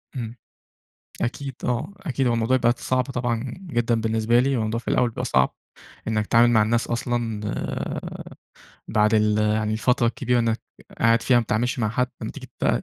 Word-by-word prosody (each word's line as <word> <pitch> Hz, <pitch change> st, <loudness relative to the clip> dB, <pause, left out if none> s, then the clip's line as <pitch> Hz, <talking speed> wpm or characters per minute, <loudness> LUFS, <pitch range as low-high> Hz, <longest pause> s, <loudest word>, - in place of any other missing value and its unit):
امم، 115 Hz, -2 st, -5 dB, 0.9 s
أكيد 135 Hz, +2 st, -3 dB
آه، 125 Hz, +11 st, -1 dB
أكيد 140 Hz, -9 st, -1 dB
هو 120 Hz, -, +2 dB
الموضوع 115 Hz, +3 st, +2 dB
بقت 120 Hz, -1 st, +2 dB
صعب 130 Hz, 0 st, +1 dB
طبعًا 120 Hz, -3 st, -2 dB, 0.3 s
جدًا 120 Hz, -3 st, +1 dB
بالنسبة 110 Hz, +1 st, +2 dB
لي، 135 Hz, +2 st, +2 dB
الموضوع 110 Hz, 0 st, -1 dB
في 115 Hz, -, -18 dB
الأول 125 Hz, -, +2 dB
بيبقى -, -, -4 dB
صعب، 65 Hz, 0 st, +2 dB, 0.5 s
إنّك 110 Hz, -1 st, 0 dB
تتعامل 120 Hz, +2 st, +5 dB
مع 110 Hz, -2 st, +5 dB
الناس 115 Hz, +2 st, +1 dB
أصلًا، 120 Hz, -2 st, -2 dB
آآ، -, -, -4 dB, 0.7 s
بعد 105 Hz, +1 st, +3 dB
ال 105 Hz, -1 st, +3 dB
يعني 105 Hz, 0 st, +1 dB
الفترة 120 Hz, +2 st, +2 dB
الكبيرة 125 Hz, +1 st, 0 dB
إنّك 115 Hz, -1 st, +1 dB, 0.4 s
قاعد 115 Hz, 0 st, +4 dB
فيها 125 Hz, -, +4 dB
ما 120 Hz, -, +4 dB
بتتعاملش 120 Hz, +3 st, -1 dB
مع 110 Hz, -, +1 dB
حد، 125 Hz, +3 st, 0 dB
لمّا -, -, -3 dB
تيجي -, -, -10 dB
بقى -, -, +2 dB
115 Hz, 180 wpm, -24 LUFS, 110-125 Hz, 0.9 s, تتعامل